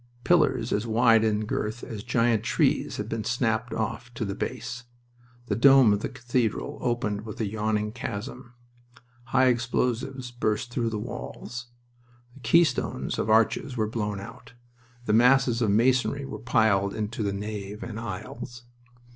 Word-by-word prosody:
Pillars 150 -7 +2
as 105 +3 -1
wide 115 0 +4
in 110 -1 +1
girth 110 +2 -3
as 110 -4 -6
giant 115 -2 +2
trees 115 - +1
had 105 - -4
been 115 -1 -3
snapped 115 0 0
off 115 +2 -3
to 115 - -2
the 100 - -3
base. 125 +3 -5 0.6
The - - -1
dome 135 -3 +7
of 100 - 0
the - - -3
cathedral 120 -2 -2
opened 120 -4 -1
with 110 0 -8
a 110 - 0
yawning 105 0 -1
chasm. 120 +2 -6 0.7
High 130 +2 +3
explosives 125 +1 0
burst 120 0 -1
through 120 -1 0
the 110 - -3
walls. 120 +3 -7 0.7
The 135 - -15
keystones 135 +3 +1
of 110 - -1
arches 115 +3 +2
were 110 - +1
blown 105 -2 -3
out, 115 +4 -11 0.5
and 105 -1 +3
masses 125 -1 +4
of 110 - +2
masonry 130 +5 +2
were - - -7
piled 110 -4 +2
into 110 +3 -3
the 100 -2 0
nave 105 0 -5
and 110 -2 -6
aisles. 120 +3 -7
115 Hz, 155 wpm, -26 LUFS, 105-125 Hz, 0.7 s, dome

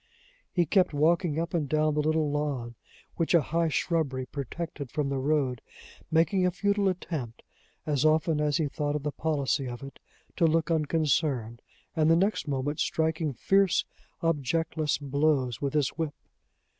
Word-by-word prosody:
He 175 -2 +2
kept 180 -1 +2
walking 165 +1 +2
up 165 0 -3
and 155 -5 -1
down 155 0 +2
the 150 - 0
little 155 -1 +1
lawn, 140 -5 -2 0.4
which 165 +1 +2
a 170 - +6
high 165 +4 0
shrubbery 150 -5 0
protected 140 +1 -6
from 145 +2 -1
the 135 -1 -1
road, 135 -3 0 0.5
making 170 +4 +3
a 180 - +4
futile 200 +2 +1
attempt, 155 -10 -5 0.4
as 145 -3 0
often 155 0 +3
as 150 0 +1
he 160 -3 0
thought 145 +1 -2
of 150 - -3
the 150 - -1
policy 140 -3 -1
of 120 +2 -7
it, 135 -1 -10 0.4
to 165 - +4
look 165 +1 +1
unconcerned, 150 -6 0 0.3
and 155 -1 +3
the 165 - +6
next 195 0 +1
moment 145 +1 -2
striking 160 -1 0
fierce, 195 - +2 0.4
objectless 160 0 0
blows 140 -4 0
with 140 0 -2
his 145 -3 +2
whip. 160 -3 -4
155 Hz, 160 wpm, -28 LUFS, 140-165 Hz, 0.5 s, a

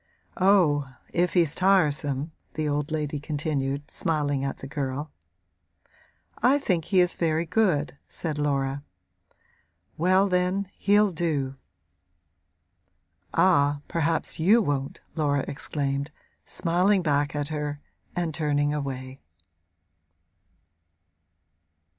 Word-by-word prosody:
'Oh 165 -8 +3 0.2
if 175 +1 +1
he's 165 -4 +4
tiresome!' 150 -6 +2 0.2
the 155 -1 -1
old 145 0 -1
lady 150 -2 -2
continued, 145 -2 -2
smiling 145 -4 -1
at 135 - -3
the - - -9
girl. 140 +1 -4 1.3
'I 265 +3 +5
think 180 - 0
he 190 0 +2
is 180 0 +3
very 165 0 0
good,' 155 - +1
said 155 -3 -4
Laura. 140 -1 0 1.2
'Well 185 +4 +4
then, 185 +1 0
he'll 205 0 +4
do.' 150 -6 -1 1.8
'Ah, 145 -5 +3
perhaps 165 -1 -1
you 200 +9 +5
won't!' 140 -9 -2
Laura 145 -3 0
exclaimed, 140 0 -2 0.4
smiling 185 +3 +2
back 145 -1 +1
at 145 -1 -2
her 150 -1 -3 0.4
and 170 -3 -1
turning 145 -2 +1
away. 135 -2 -5
150 Hz, 100 wpm, -26 LUFS, 145-175 Hz, 1.8 s, I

